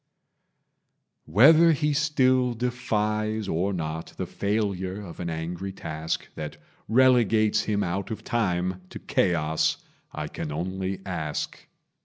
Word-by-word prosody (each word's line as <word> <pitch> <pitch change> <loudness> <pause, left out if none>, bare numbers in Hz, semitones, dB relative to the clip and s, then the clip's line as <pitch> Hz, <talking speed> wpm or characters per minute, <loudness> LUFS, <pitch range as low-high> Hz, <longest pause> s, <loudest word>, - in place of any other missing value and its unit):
Whether 155 - +7
he 150 0 +1
still 130 -4 +2
defies 110 -3 -1
or 95 +3 0
not 80 -3 -4
The - - -2
failure 100 -2 -2
of 85 - -10
an 85 - -3
angry 85 +4 -4
task 80 -3 -4
That 75 -1 -6 0.3
relegates 115 -3 +4
him 105 -1 0
out 95 +2 -2
of 110 - -5
time 90 -6 -1
To - - -8
chaos, 80 -3 +1 0.3
I 75 0 -4
can 75 - -5
only 95 +4 -3
ask. 80 -6 -4
100 Hz, 120 wpm, -26 LUFS, 85-115 Hz, 0.3 s, Whether